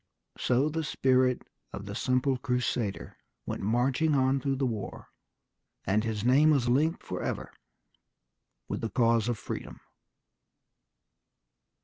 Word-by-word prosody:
So 130 +4 +2
the 160 +1 -2
spirit 130 -3 +2 0.3
of - - -7
the - - -6
simple 130 +1 +1
crusader 125 -5 -2 0.3
went - - -4
marching 125 +8 +2
on 135 0 +3
through 135 +1 -1
the 135 0 0
war, 110 -5 -5 0.8
and 105 +3 +2
his 110 -1 -2
name 140 +5 +5
was 140 -6 +3
linked 150 +7 +2
forever - - -4 1.1
with - - -3
the 115 - -2
cause 115 -1 +2
of 120 - -1
freedom. - - -6
125 Hz, 120 wpm, -29 LUFS, 115-135 Hz, 1.1 s, name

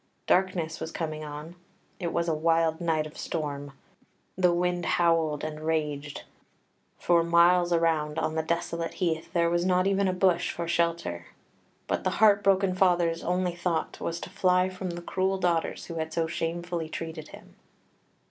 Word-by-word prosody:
Darkness 175 -3 +1
was 160 0 -5
coming 155 -2 -4
on; 150 +3 -8 0.4
it 170 -3 -2
was 170 0 -1
a 165 - +1
wild 165 +1 +1
night 160 -2 +1
of 155 - -10
storm; 145 -3 -4 0.6
the 180 -1 +3
wind 175 0 0
howled 165 -3 +1
and 155 0 -4
raged; 150 -2 -2 0.7
for 170 -1 +3
miles 175 +1 +4
around 160 -2 +1
on 155 0 -1
the 160 - 0
desolate 170 +1 -2
heath 165 -4 -2
there 170 -1 +3
was 170 0 +1
not 185 0 +2
even 195 0 +2
a - - +2
bush 185 -1 +2
for 170 -1 -4
shelter. 170 - -1 0.6
But - - -2
the - - +1
heart 205 -2 +5
broken 195 -1 +3
father's 175 -3 +2
only 180 0 0
thought 170 -1 -2
was 170 0 -3
to - - -8
fly 185 -1 +2
from 185 0 -5
the 175 0 -6
cruel 190 +2 0
daughters 175 -3 -1
who 170 - -7
had 160 0 -3
so 165 +1 0
shamefully 170 0 -3
treated 160 -1 -6
him. - - -14
170 Hz, 165 wpm, -27 LUFS, 160-180 Hz, 0.7 s, heart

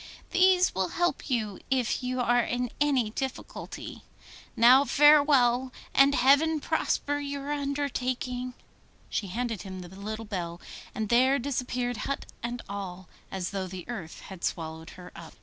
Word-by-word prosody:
These 370 0 +4
will 190 -1 0
help 350 -3 0
you 215 -6 -1
if 255 -3 +1
you 255 0 -2
are 245 0 +3
in 245 +1 -2
any 265 -7 +2
difficulty. 265 +3 -6 0.5
Now 250 +4 +7
farewell, 280 -4 +5 0.2
and 275 +1 +5
heaven 300 +4 +4
prosper 290 0 0
your 280 0 -4
undertaking.' 255 -3 -2 0.6
She 205 - -1
handed 230 +1 -3
him 190 -2 -7
the 175 - -10
little 215 +4 -6
bell, 175 -5 -4 0.4
and 215 -2 -2
there 260 +3 +4
disappeared 250 -2 -2
hut 275 +5 -3 0.2
and 240 0 -4
all, 190 -3 -6 0.2
as 185 -2 -4
though 195 -2 -3
the 185 -1 -8
earth 190 -10 -7
had 190 -3 -11
swallowed 160 0 -4
her 180 -1 -11
up. 170 -1 -11
245 Hz, 145 wpm, -28 LUFS, 200-275 Hz, 0.6 s, Now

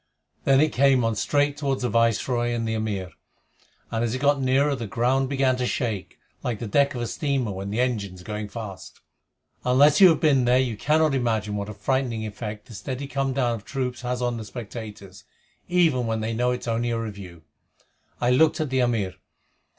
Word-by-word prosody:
Then 135 -1 +5
it 155 0 +2
came 135 -1 +4
on 115 0 +1
straight 145 +6 +1
toward 135 -3 -1
the 125 - 0
Viceroy 120 +1 +1
and 115 -1 -2
the 110 - -1
Amir, 105 -5 -3 0.8
and 115 0 0
as 120 +1 -1
it - - -3
got 140 0 +2
nearer 135 +2 +2
the 115 -4 -5
ground 130 +5 +1
began 135 -2 +2
to 125 -1 -1
shake, 110 -10 -3 0.2
like 120 -3 -2
the 115 - -5
deck 140 +6 +2
of 120 - -3
a - - -1
steamer 135 -4 -1
when 95 +1 -5
the 105 +4 -2
engines 105 -8 -1
are - - -16
going 105 -1 -4
fast. 100 -4 -8 0.6
Unless 140 +6 +5
you 185 - +10
have 160 - +2
been 140 -5 +3
there 125 +1 +4
you 130 -3 0
cannot 155 +6 +2
imagine 110 -5 0
what 100 0 -4
a - - -6
frightening 120 0 -1
effect 105 0 -6
this 115 -5 -9
steady 135 +1 -4
come 135 -1 -1
down 125 -3 +1
of 110 -3 -6
troops 125 -1 -3
has 125 0 -2
on 120 -1 -1
the 110 - -5
spectators, 105 -4 -9 0.5
even 160 -9 +3
when 110 0 -1
they 110 +1 -2
know 125 +2 +1
it 125 0 -2
is - - -8
only 115 +1 0
a 115 - 0
review. 100 -7 -7 0.8
I 120 - +2
looked 155 +5 +4
at 155 -4 -2
the 130 - +1
Amir. 115 -7 +1
120 Hz, 210 wpm, -25 LUFS, 110-135 Hz, 0.8 s, you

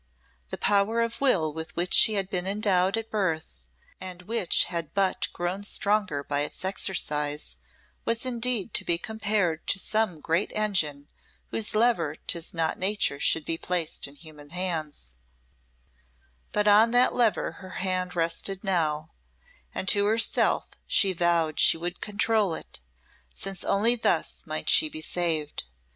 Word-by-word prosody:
The - - -5
power 205 +3 +2
of 230 +2 -3
will 170 - +2
with 160 +1 -7
which 175 +2 -1
she 215 - +6
had 195 -2 -1
been 180 -1 -3
endowed 195 -1 +1
at 225 0 -5
birth, 160 - -2 0.4
and 180 -1 -8
which 220 -2 +2
had 170 -2 -5
but 195 -2 +1
grown 175 +3 -3
stronger 205 -8 +1
by 145 0 -1
its 150 +5 -3
exercise, 150 - 0 0.4
was 230 +2 -1
indeed 240 -4 0
to - - +2
be 170 - +1
compared 205 -5 -1
to - - +1
some 215 -4 -1
great 165 +6 0
engine 160 -9 0 0.4
whose 220 -1 -1
lever 215 -10 +2
'tis 170 +1 -4
not 165 -2 -1
nature 190 -7 0
should 160 +1 +2
be 165 0 -2
placed 175 -5 -1
in 140 - -13
human 150 -2 -14
hands; 155 - -3 1.4
but 210 0 0
on 210 +3 +6
that 245 +2 +4
lever 235 -4 +1
her 190 - -10 0.2
hand 185 -1 -1
rested 170 +4 -2
now, 160 -5 -1 0.6
and 190 - -4
to 205 0 +3
herself 225 +2 +2 0.2
she 195 -2 +3
vowed 170 -3 +1
she - - +6
would 175 +2 -5
control 210 -3 0
it, - - -8 0.5
since 195 - -2
only 225 +5 +3
thus 235 - -1
might - - -4
she 310 - +5
be 315 - -7
saved. 165 - -2
185 Hz, 150 wpm, -26 LUFS, 160-210 Hz, 1.4 s, she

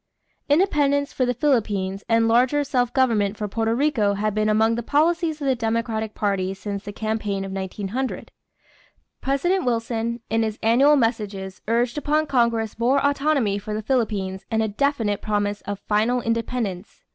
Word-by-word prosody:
= - - -44
Independence 290 -4 +2
for 255 - 0
the 245 - +1
Philippines 210 -8 0
and 230 0 +3
larger 250 +5 +3
self 250 -4 0
government 220 -6 +1
for 210 - -3
Porto 225 +2 -1
Rico 240 -7 +1
had 210 +1 -1
been 215 +1 +1
among 220 +1 +3
the 235 - -2
policies 320 +4 +1
of 285 - -4
the 270 - +3
Democratic 225 -2 -2
party 195 -2 -1
since 200 0 -5
the 205 - -6
campaign 210 -2 -2
of 195 - -6
1900. 195 +6 -4 0.9
President 350 +8 +1
Wilson 235 -1 -1
in 225 +1 +1
his 220 -1 -2
annual 265 +7 +5
messages 210 -6 -2
urged 235 +4 +1
upon 300 +1 +1
Congress 235 -5 0
more 250 +4 +3
autonomy 280 -8 +1
for 210 +1 -5
the 215 - -4
Filipinos 205 -6 -1
and 220 -1 +1
a - - 0
definite 220 -2 0
promise 205 -1 -1
of 205 0 -3
final 220 +5 +1
independence. 230 -4 -3
225 Hz, 165 wpm, -23 LUFS, 205-265 Hz, 0.9 s, annual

